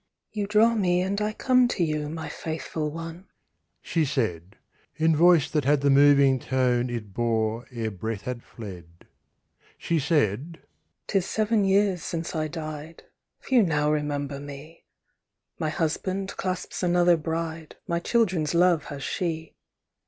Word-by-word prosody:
"You 205 -2 -3
draw 215 +3 +4
me, 180 -5 +2
and 200 +2 -1
I 210 0 0
come 250 +3 +3
to 200 -7 -1
you, 150 -2 -1
My 160 +1 -5
faithful 160 -1 -4
one," 165 +4 -8 0.6
she 165 - 0
said, 105 - -2 0.4
In 160 +1 +3
voice 170 -1 +5
that 150 -2 +1
had 145 +1 +3
the 140 0 +3
moving 140 -1 +5
tone 125 -1 +1
It 110 -5 -5
bore 115 0 -1
ere 115 -3 -3
breath 105 +1 -5
had 125 0 -4
fled. 90 -8 -11 0.7
She 165 -1 0
said: 150 - 0 0.5
"'Tis 195 -3 0
seven 215 -1 +1
years 195 -2 +2
since 165 -1 -4
I 155 -1 0
died: 155 0 -7 0.4
Few 255 -3 +3
now 150 -5 +1
remember 145 -2 -2
me; 145 +3 -11 0.7
My 155 - 0
husband 185 +4 -2
clasps 185 -1 -4
another 175 -1 +4
bride; 160 0 -4
My 170 0 0
children's 180 -7 +1
love 175 -3 +3
has 140 -1 -7
she. 160 -3 -3
155 Hz, 145 wpm, -26 LUFS, 140-175 Hz, 0.7 s, voice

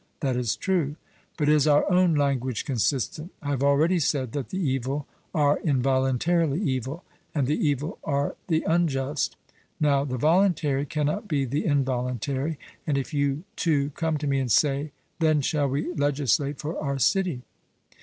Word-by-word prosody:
'That 135 -4 0
is 120 -3 0
true.' 170 -7 0 0.4
But 150 -3 0
is 150 -1 +4
our 145 0 +5
own 180 -2 +4
language 130 -5 0
consistent? 140 +4 -1
I 145 - -5
have 135 -2 -1
already 150 +6 +3
said 135 -5 0
that 140 -1 -4
the 185 - -4
evil 135 -3 -1 0.3
are 145 -2 +2
involuntarily 135 +3 +1
evil; 135 - -2 0.3
and 140 -3 +2
the 150 +3 +1
evil 145 - -2
are 140 -1 -1
the 160 -3 +1
unjust. 150 -4 0 0.4
Now 140 -2 +3
the 130 -3 -3
voluntary 155 -2 +2
cannot 150 +9 -1
be 145 -6 0
the 140 +5 -2
involuntary; 135 +1 -1 0.3
and 145 -2 +1
if 140 +3 -3
you 145 +1 0
two 145 -4 +1
come 160 +1 -1
to 145 - -4
me 140 -1 +1
and 130 -3 -1
say, 145 +3 +2 0.3
'Then 155 -2 +3
shall 145 +1 +1
we 145 +6 -2
legislate 145 - +1
for 155 +4 -4
our 140 -1 -1
city?' 175 -3 +1
145 Hz, 160 wpm, -26 LUFS, 135-155 Hz, 0.4 s, our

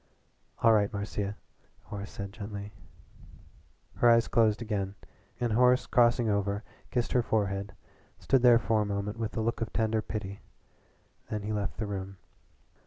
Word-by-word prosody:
"All 115 -1 +7
right, 105 -1 +3
Marcia," 100 0 -3 0.5
Horace 100 0 -7
said 100 0 -7
gently. 100 -1 -7 1.3
Her 120 - +5
eyes 115 0 +5
closed 110 -2 +3
again 100 -4 -3 0.4
and 120 -2 0
Horace 125 +2 +4
crossing 120 -1 +3
over 100 0 0 0.3
kissed 120 -1 -1
her 125 - +3
forehead 100 -3 -1 0.4
stood 135 -2 +2
there 120 -1 +7
for 115 -2 +1
a - - 0
moment 100 +2 -3
with 115 0 -3
a - - +1
look 115 +1 -1
of 115 - -2
tender 110 0 +1
pity. 100 -2 -5 0.9
Then 105 -1 -3
he 105 +1 -2
left 105 -2 -2
the 110 - -2
room. 95 -1 -5
105 Hz, 155 wpm, -29 LUFS, 100-115 Hz, 1.3 s, All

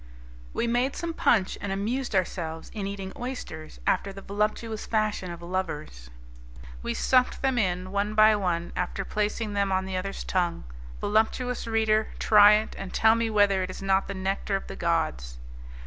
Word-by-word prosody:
We - - -1
made 245 +3 +1
some 335 -1 -3
punch, 215 - +2
and 200 - -3
amused 225 +5 -2
ourselves 170 -3 -2
in 205 -3 -3
eating 195 -1 -5
oysters 240 -11 -7
after 195 +1 +1
the 195 0 -10
voluptuous 215 +2 -2
fashion 215 -4 0
of 170 0 -8
lovers. 155 - -4 0.7
We - - -3
sucked 255 +1 +2
them 265 -2 +2
in, 185 -2 -1
one 200 +2 -1
by 215 0 +7
one, 175 -4 -1
after 180 +2 -2
placing 210 0 -2
them 200 -1 +1
on 190 0 +1
the 190 -1 -3
other's 195 +2 -4
tongue. 175 -2 -1 0.4
Voluptuous 225 +4 0
reader, 220 -1 +2
try 210 -1 +7
it, 215 +1 +1
and 195 -1 -6
tell 220 0 +5
me 230 0 0
whether 205 -3 +3
it 185 - -2
is 185 - -7
not 195 0 +2
the 195 - -5
nectar 195 +1 -1
of 195 - -3
the - - -8
gods! 155 - -1
200 Hz, 175 wpm, -27 LUFS, 185-220 Hz, 0.7 s, by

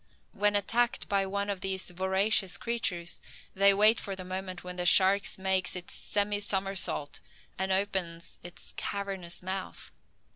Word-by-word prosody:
When 205 0 0
attacked 235 +4 0
by 195 -1 0
one 200 +1 -3
of 200 -3 -4
these 190 -1 -3
voracious 190 +1 +2
creatures, 195 -7 0 0.3
they 200 +1 +5
wait 210 +3 +5
for 195 - -4
the 185 -1 -8
moment 185 0 -6
when 180 0 -8
the 180 - -3
shark 195 +2 +7 0.2
makes 190 -1 0
its 180 -1 -6
semi 205 0 0
somersault, 195 -7 +1 0.4
and 190 0 -2
opens 190 -4 -1
its 175 0 -7
cavernous 190 -4 -4
mouth. 190 +1 -5
190 Hz, 145 wpm, -29 LUFS, 185-200 Hz, 0.4 s, shark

